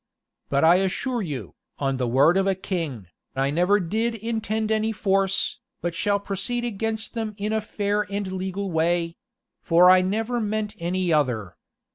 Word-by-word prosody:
But 140 +1 +2
I 170 +2 +7
assure 220 +6 -1
you, 130 - -5 0.2
on 135 -2 -1
the 125 -1 -1
word 140 +8 +4
of 195 0 +2
a 195 - +2
king, 165 - -4 0.3
I 135 +1 +1
never 180 +6 +3
did 220 +6 -1
intend 220 -1 -2
any 220 0 +1
force, 195 +1 +1 0.2
but 175 -1 -2
shall 200 +4 +1
proceed 220 +5 -2
against 220 0 -3
them 220 -3 -3
in 210 +1 -2
a 220 - +1
fair 205 0 -1
and 200 -1 -2
legal 190 +1 -3
way; 165 +1 0 0.4
for 180 +2 +6
I 185 0 +6
never 225 +6 -1
meant 215 0 -2
any 175 0 0
other. 120 - 0
195 Hz, 165 wpm, -24 LUFS, 165-215 Hz, 0.4 s, I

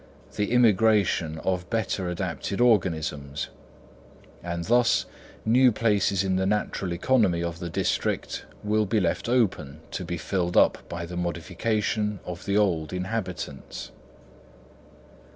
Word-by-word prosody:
the 105 +1 -1
immigration 105 -8 +3
of 90 -1 -1
better 110 -5 -1
adapted 90 +2 -3
organisms; 80 - +1 0.9
and 85 -1 -4
thus 120 +1 +3 0.4
new 125 +3 +5
places 100 -3 +2
in 95 -1 +1
the 95 - +1
natural 100 -2 -1
economy 90 -3 +2
of 85 0 -4
the 85 -1 -4
district - - -1 0.2
will 105 0 +1
be 110 +3 +2
left 90 +4 -1
open 100 - +1
to - - -4
be 85 - -4
filled 90 +1 -1
up - - +5
by 85 0 -4
the 90 +1 -7
modification 105 +5 -1
of 90 -1 -7
the 100 0 +1
old 85 -7 +1
inhabitants. 90 - -5
95 Hz, 125 wpm, -26 LUFS, 85-110 Hz, 0.9 s, new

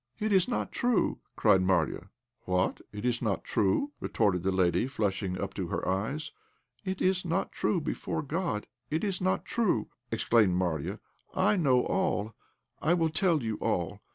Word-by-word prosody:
"It's 200 -4 +3
not 245 - -2
true!" 245 -3 +1 0.2
cried 95 - +4
Marya. 90 0 +1 0.4
"What! 90 0 0
it's 115 +3 -1
not 105 -5 -1
true?" 105 - +1
retorted 90 -4 +1
the 95 +2 +1
lady, 95 +5 +2
flushing 100 -6 -1
up - - -3
to - - -3
her - - -3
eyes. 110 +12 -1 0.5
"It 190 -1 -2
is 185 0 +2
not 180 +2 -1
true, 185 - 0
before 160 0 -3
God 155 - -2 0.2
it 160 +5 -1
is 195 -3 -1
not 185 0 +1
true," 200 - 0 0.2
exclaimed 115 -4 +3
Marya. 85 -5 -1 0.4
"I 205 +3 +3
know 135 -9 +3
all; 115 - 0 0.5
I 165 +3 +3
will 165 -2 +2
tell 165 - +2
you 110 -2 -2
all. 90 +4 -1
125 Hz, 155 wpm, -29 LUFS, -, 0.5 s, cried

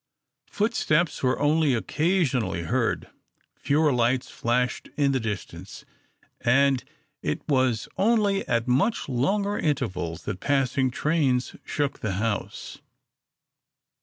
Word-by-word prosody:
Footsteps 190 -7 +1
were 130 -1 +1
only 150 -2 +3
occasionally 140 - 0
heard, 80 - -1 0.5
fewer 150 0 +2
lights 125 +1 +1
flashed 125 +1 -1
in 140 -2 +3
the 135 - +1
distance, 95 -4 -6 0.5
and 135 +1 +3 0.4
it 75 - -3
was 130 -6 +1
only 205 -2 +2
at 115 0 0
much 195 - +1
longer 200 +11 0
intervals 95 - -2
that 95 - -4
passing 135 -1 +1
trains 135 -2 0
shook 145 -2 -2
the 110 -5 -2
house. 105 +1 -3
130 Hz, 105 wpm, -25 LUFS, 120-155 Hz, 0.5 s, only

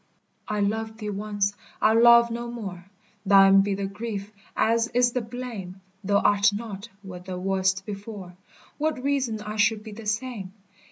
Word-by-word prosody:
I 210 -1 -1
loved 220 +2 -2
thee 210 -2 -4
once, 205 0 -1 0.3
I'll 220 +2 +4
love 235 0 +7
no 235 +1 -4
more, 195 -7 -7 0.4
Thine 195 -1 +7
be 200 0 0
the 200 0 -3
grief 205 0 -5 0.3
as 230 +1 +2
is 245 0 +4
the 250 - -1
blame; 225 -6 -7 0.2
Thou 200 +1 +2
art 205 0 +4
not 205 0 -6
what 180 -2 -9
thou 185 -1 -5
wast 190 0 0
before, 200 -3 -8 0.4
What 305 -4 -1
reason 265 -6 0
I 210 +1 -6
should 215 0 +2
be 220 - -9
the 215 +1 -9
same? 210 -3 -3
210 Hz, 165 wpm, -25 LUFS, 195-230 Hz, 0.4 s, love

